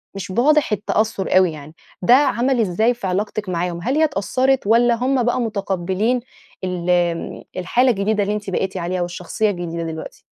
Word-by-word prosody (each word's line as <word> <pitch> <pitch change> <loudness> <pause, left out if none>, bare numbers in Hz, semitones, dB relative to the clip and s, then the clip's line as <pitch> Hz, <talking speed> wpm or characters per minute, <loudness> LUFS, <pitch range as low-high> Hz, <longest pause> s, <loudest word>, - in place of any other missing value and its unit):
مش 190 -1 -6
واضح 295 +7 +3
التأثُّر 210 -2 0
أوي 185 -2 +4
يعني، 150 0 -10 0.3
ده 215 +7 +5
عمل 260 -2 +2
إزاي 220 +3 +2
في 215 -5 -5
علاقتِك 205 +1 -2
معاهم، 175 0 -2
هل 260 - 0
هي 315 - +3
اتأثَّرِت 260 - +1
والّا 235 +2 +4
هُم 255 +2 +1
بقى 245 +1 +1
مُتقبِّلين 200 +1 -1 0.4
ال 180 -1 -3
امم، 175 -1 0
الحالة 245 +8 +2
الجديدة 210 0 0
اللي 205 +1 -1
أنتِ 205 -2 -5
بقيتِ 190 +1 -2
عليها 180 +1 -2
والشخصيّة 180 +5 -1
الجديدة 170 -3 -4
دلوقتي؟ 160 -1 -7
200 Hz, 170 wpm, -20 LUFS, 180-240 Hz, 0.4 s, ده